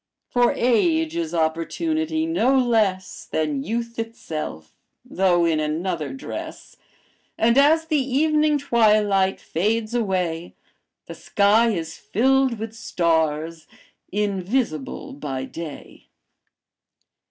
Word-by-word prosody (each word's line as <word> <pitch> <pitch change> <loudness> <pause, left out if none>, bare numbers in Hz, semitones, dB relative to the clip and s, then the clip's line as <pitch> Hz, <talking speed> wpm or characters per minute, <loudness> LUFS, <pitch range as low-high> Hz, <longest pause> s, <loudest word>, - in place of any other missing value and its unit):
For 245 -1 +3
age 320 +7 +2
is 165 -2 -2
opportunity 315 - -1
no 270 -5 +2
less 215 -7 0
Than 150 -3 -1
youth 230 +3 -4
itself, 155 - -6 0.3
though 180 -2 +2
in 160 -2 +1
another 155 +1 -2
dress, 270 - -8 0.6
And 230 +1 +3
as 305 +4 +4
the 310 -3 +1
evening 300 +3 +2
twilight 210 -7 +2
fades 215 +6 -1
away 180 -7 -1 0.5
The - - -8
sky 215 +3 +3
is 165 -6 -3
filled 265 +2 +1
with 220 +1 -6
stars, 160 -5 -1 0.4
invisible 200 - -2
by 135 -2 -5
day.'" 160 +1 -9
210 Hz, 100 wpm, -23 LUFS, 165-255 Hz, 0.6 s, as